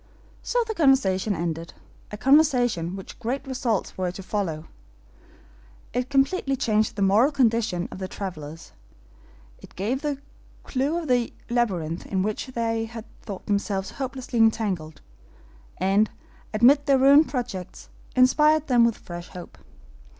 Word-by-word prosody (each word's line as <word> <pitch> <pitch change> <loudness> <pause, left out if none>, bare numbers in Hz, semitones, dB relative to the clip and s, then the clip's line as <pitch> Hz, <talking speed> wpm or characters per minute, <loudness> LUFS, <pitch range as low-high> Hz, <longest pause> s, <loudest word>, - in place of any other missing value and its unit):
So 485 0 0
the 440 - -2
conversation 220 - +2
ended 165 0 -4 0.3
a 210 - -7
conversation 245 - +3
which 190 - -10
great 255 +4 -3
results 245 -8 -2
were 180 -1 0
to 195 - -8
follow; 180 -6 -3 1.3
it 250 +1 -1
completely 275 +1 +1
changed 215 -4 +1
the 200 - 0
moral 215 +9 +4
condition 230 -9 +1
of - - -8
the 190 - -4
travelers; 165 -5 -7 0.9
it - - -15
gave 230 +8 -2
the 295 -2 -2 0.5
clew 280 +5 -1
of 335 -2 -4
the 245 -2 +1 0.2
labyrinth 180 -9 -1
in 190 -2 0
which 215 +4 -3
they 230 -3 -1
had 225 0 -9 0.2
thought 195 -3 -8
themselves 200 -2 -1
hopelessly 260 -2 -4
entangled, 200 -9 +1 0.8
and, 195 +3 +2 0.4
amid 270 +7 +4
their 275 -1 +5
ruined 280 +4 +6
projects, 235 -9 -5 0.3
inspired 300 +4 +4
them 245 -4 +4
with 235 -2 +2
fresh 175 0 -8
hope. 180 -1 -10
225 Hz, 135 wpm, -25 LUFS, 190-270 Hz, 1.3 s, ruined